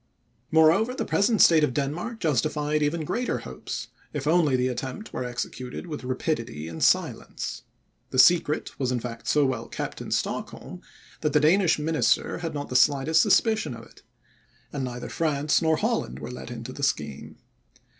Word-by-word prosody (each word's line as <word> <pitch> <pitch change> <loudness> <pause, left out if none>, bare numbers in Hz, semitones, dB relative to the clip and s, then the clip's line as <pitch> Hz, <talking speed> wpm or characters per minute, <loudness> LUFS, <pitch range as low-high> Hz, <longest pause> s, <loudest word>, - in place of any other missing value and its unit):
Moreover, 165 +10 +4
the - - -2
present 210 +1 +3
state 160 -2 +6
of 130 -4 0
Denmark 165 - -3
justified 150 - 0
even 155 +2 0
greater 245 +10 -1
hopes, - - -7 0.2
if 145 -2 -4
only 155 -3 +3
the 125 0 +1
attempt 130 - -5
were - - -3
executed 125 +2 -5
with 155 -6 -6
rapidity 125 - -3
and 80 -1 -4
silence. - - 0 0.5
The - - -4
secret 155 0 +4
was 130 -2 0
in 125 - 0
fact 115 -1 -7
so 150 -1 +3
well 130 -3 -2
kept - - -5
in - - -7
Stockholm, - - -3 0.4
that 150 - -1
the 150 - +5
Danish 165 +3 +4
minister 150 -4 +1
had 165 -3 -4
not 145 0 -4
the 125 - -5
slightest 145 +4 +4
suspicion 220 - +2
of 115 0 -11
it; - - -19 0.7
and 140 -2 -3
neither 125 -1 -5
France 150 -2 +1
nor 160 -1 +3
Holland 60 - -1
were 75 - -7
let 125 - -8
into 120 +1 -7
the 140 - -8
scheme. 75 - -2
145 Hz, 170 wpm, -26 LUFS, 125-160 Hz, 0.7 s, state